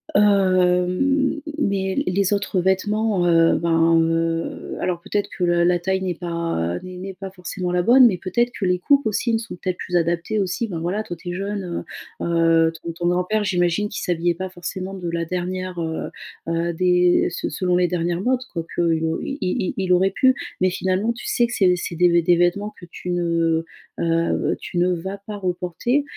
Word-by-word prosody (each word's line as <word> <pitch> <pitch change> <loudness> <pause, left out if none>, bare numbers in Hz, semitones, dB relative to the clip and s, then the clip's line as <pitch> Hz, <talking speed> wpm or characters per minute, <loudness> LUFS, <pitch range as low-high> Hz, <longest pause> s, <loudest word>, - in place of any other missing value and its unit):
Hem, 200 - +6
m 190 - +2 0.2
mais 195 -8 0
les 195 +2 +1
autres 200 -2 0
vêtements, 195 +1 +1
heu, 165 -1 +4
ben, 165 0 +3
heu, 165 0 -1
alors 175 -2 -1
peut-être 205 +3 -2
que 180 - -1
la 175 0 +3
la 175 0 +3
taille 190 +2 -1
n'est 185 -2 -2
pas, 170 - -2
heu, - - -4
n'est 185 0 -8
n'est 190 +1 -6
pas 190 +1 -7
forcément 180 0 -4
la 180 - +2
bonne, 245 +6 +7
mais 190 -6 0
peut-être 235 +7 0
que - - -4
les 180 0 +1
coupes 280 +8 +3
aussi 220 +2 0
ne - - +3
sont 230 0 -7
peut-être 185 0 -3
plus 180 - -4
adaptées 170 +5 0
aussi. 200 +5 -1
Ben, 170 -4 -4
voilà 180 +6 -2
toi 175 - -6
tu 175 - -8
es - - -3
jeune, 195 -2 -4 0.4
heu, - - -1
heu, 165 -1 +3
ton 170 - -4
ton 170 +1 -2
grand-père 180 +4 0
j'imagine 180 +1 +1
qu'il - - -5
s'habillait 175 0 0
pas 185 +2 -4
forcément 185 +1 -6
de 180 -3 -5
la 170 0 -2
dernière, 180 +1 -3
heu, 160 -1 -3 0.4
heu, 170 +1 0
des 180 +1 +3
se 175 - -4
selon 180 -1 0
les 180 0 +3
dernières 175 0 -1
modes. 255 +4 +1
Quoi 165 -3 -3
qu'il 165 -2 +1
au 160 0 -1
il 275 - -4
il 180 0 -1
il 185 -1 -1
aurait 190 +2 +3
pu, 260 +6 +3 0.3
mais 185 - +4
finalement 190 +4 0
tu 240 - -10
sais 240 - +2
que 240 - -6
c'est 185 -5 +4
c'est 175 - -4
des 175 +1 +4
v 170 0 +4
des 175 +1 +4
vêtements 175 +5 +1
que - - -11
tu 180 - -7
ne, 165 -2 +1 0.3
heu, 165 0 +1
tu - - -6
ne 180 +1 +3
vas 190 +3 -5
pas 210 -1 -6
reporter. 185 - -1
180 Hz, 210 wpm, -22 LUFS, 170-195 Hz, 0.4 s, bonne